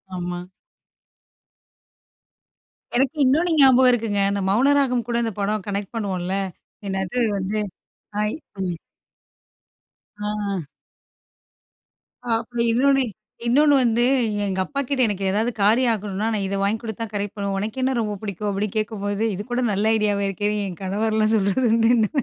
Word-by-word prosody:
ஆமா. 175 0 -4 2.5
எனக்கு 270 +5 +2
இன்னொன்ணு 320 +7 +3
ஞாபகம் 260 -1 +7
இருக்குங்க. 225 -4 0
அந்த 200 0 -1
மௌனராகம் 250 +1 +3
கூட 240 - -2
இந்த 225 - -1
படம் 205 0 -1
கனெக்ட் 200 0 -3
பண்ணுவோம்ல. 190 -4 -2 0.5
என்னது 190 +2 -3 0.2
வந்து 200 +3 -2 0.6
ஹாய் 210 +6 0 0.3
ம். 180 -2 -2 1.4
ஆ 205 -4 -2 1.7
அப்புறம் 235 +1 -2
இன்னொன்னு, 270 +3 +3 0.4
இன்னொன்னு 290 +4 +5
வந்து 235 0 +2 0.4
எங்க 190 -1 -2
அப்பாக்கிட்ட 280 0 -2
எனக்கு 200 -2 -3
ஏதாவது 220 +5 +1
காரியம் 230 +4 +4
ஆகணும்னா 210 0 -3
நான் 200 -2 -1
இத 195 - -2
வாங்கி 205 +3 +1
கொடுத்துதான் 225 -1 -5
கரெக்ட் 205 0 -3
பண்ணுவேன். 200 -1 -2
உனக்கென்ன 255 +5 -1
ரொம்ப 210 -2 -2
பிடிக்கும்? 205 0 -3
அப்டின்னு 200 +1 -2
கேட்கும்போது 205 -1 -2
இது 205 - -5
கூட 250 +1 0
நல்ல 215 +3 +2
ஐடியாவா 205 -1 +1
இருக்கேன்னு 205 +2 -1
என் 180 -3 -8
கணவர்லாம் 215 +3 +1
சொல்றதுண்டுனே. 225 +1 +3
215 Hz, 125 wpm, -23 LUFS, 200-240 Hz, 2.5 s, ஞாபகம்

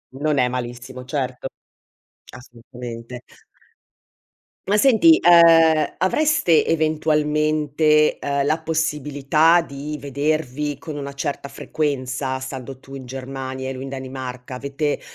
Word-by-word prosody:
Non 150 +1 0
è 125 -1 +3
malissimo, 125 +1 -6
certo. 130 -2 -3 0.8
Assolutamente. 120 0 -10 1.5
Ma 205 +2 +2
senti, 275 +7 +6
ehm, 165 -2 +5
avreste 235 - +2
eventualmente, 150 -1 +1
ehm, 140 0 -1
la 155 +2 +1
possibilità 155 0 +2
di 150 0 -7
vedervi 145 0 -2
con 155 0 -8
una 140 -1 -5
certa 140 0 -4
frequenza 130 -2 -3
stando 130 0 -7
tu 135 +1 -12
in 130 -2 -8
Germania 130 0 -6
e 135 - -3
lui 130 +1 -7
in 135 - -6
Danimarca? 130 -1 -7
Avete 140 +3 -3
140 Hz, 110 wpm, -21 LUFS, 130-155 Hz, 1.5 s, senti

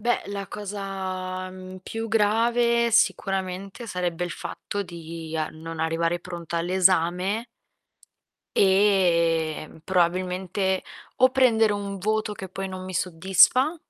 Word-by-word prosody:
Beh, 240 +3 +1
la 200 -1 -5
cosa, 190 -2 -5
mhmm, 185 0 -10
più 225 +3 -4
grave 235 +2 +2
sicuramente 195 0 0
sarebbe 180 -2 -2
il 175 - -2
fatto 200 +3 -5
di 165 -2 -7
a 155 -1 -1
non 160 0 -7
arrivare 165 +1 0
pronta 170 -2 -5
all'esame 185 +4 +2 1.1
e, 170 -6 +3
mhmm, - - -15
probabilmente 185 +1 0 0.3
o 255 0 +6
prendere 230 -5 +4
un 200 -1 -4
voto 215 +2 -1
che 190 -2 -8
poi 195 +1 -4
non 185 0 -7
mi 185 0 -7
soddisfa, 190 - +4
185 Hz, 120 wpm, -25 LUFS, 175-205 Hz, 1.1 s, o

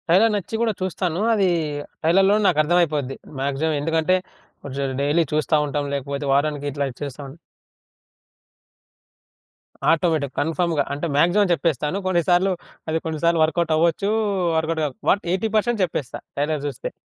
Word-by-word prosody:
Trailer 195 +7 +5
నచ్చి 205 +2 -4
గూడా 230 -2 +1
చూస్తాను. 180 -2 -2
అది 195 -4 +3 0.5
ట్రైలర్‌లోనే 195 +6 +4
నాకు 150 - +2
అర్థమైపోద్ది 150 -5 +1 0.3
మ్యాక్సిమం. 140 +3 0
ఎందుకంటే, 160 +3 +2 0.5
కొంచెం 135 -1 -3
డైలీ 145 +4 +2
చూస్తా 155 +1 +1
ఉంటాం, 145 0 -2
లేకపోతే 140 +1 -3
వారానికిట్లా 145 -1 0
చేస్తాం 140 -1 -6 2.6
ఆటోమేటిక్‌, 160 -4 +1
కన్ఫర్మ్‌గా. 165 0 0
అంటే 145 +4 -3
మాక్సిమం 175 +6 +4
జెప్పేస్తాను. 160 0 0
కొన్ని 175 -2 +2
సార్లు 180 +2 +4 0.4
అది 160 +1 0
కొన్ని 160 -2 -3
సార్లు 170 -1 +3
వర్కౌట్ 160 +1 +1
అవ్వచ్చు, 170 +5 +1 0.5
వర్కౌట్‌గాక 160 -2 -1 0.2
వాట్ 200 - +3
80% 220 +3 0
చెప్పేస్తా, 150 -6 -5 0.2
ట్రైలర్ 145 0 -1
జూస్తే. 135 -5 -5
160 Hz, 125 wpm, -22 LUFS, 145-180 Hz, 2.6 s, ట్రైలర్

